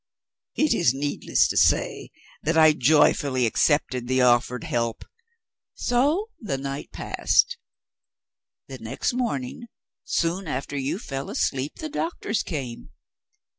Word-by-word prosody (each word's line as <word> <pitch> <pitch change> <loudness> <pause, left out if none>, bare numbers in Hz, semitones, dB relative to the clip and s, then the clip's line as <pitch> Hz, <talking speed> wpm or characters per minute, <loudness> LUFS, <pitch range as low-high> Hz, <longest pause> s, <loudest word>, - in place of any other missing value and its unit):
It 305 - +2
is 130 -7 +2
needless 145 +1 +1
to - - -2
say - - +2 0.3
that 165 +2 0
I 155 -1 +7
joyfully 140 -2 +3
accepted 125 0 +1
the 130 +1 +1
offered 120 0 +2
help. 115 -1 -2 0.7
So 295 - +1
the 150 - -3
night 135 +1 -6
passed. - - +1 1.1
The 130 -1 -9
next 115 - -2
morning, 235 - -3 0.4
soon 175 +2 -1
after 140 0 -4
you 140 +4 -2
fell 135 - -6
asleep, 135 +2 -1
the 315 - -6
doctors 300 -8 -2
came. 125 - -6
140 Hz, 120 wpm, -24 LUFS, 130-180 Hz, 1.1 s, I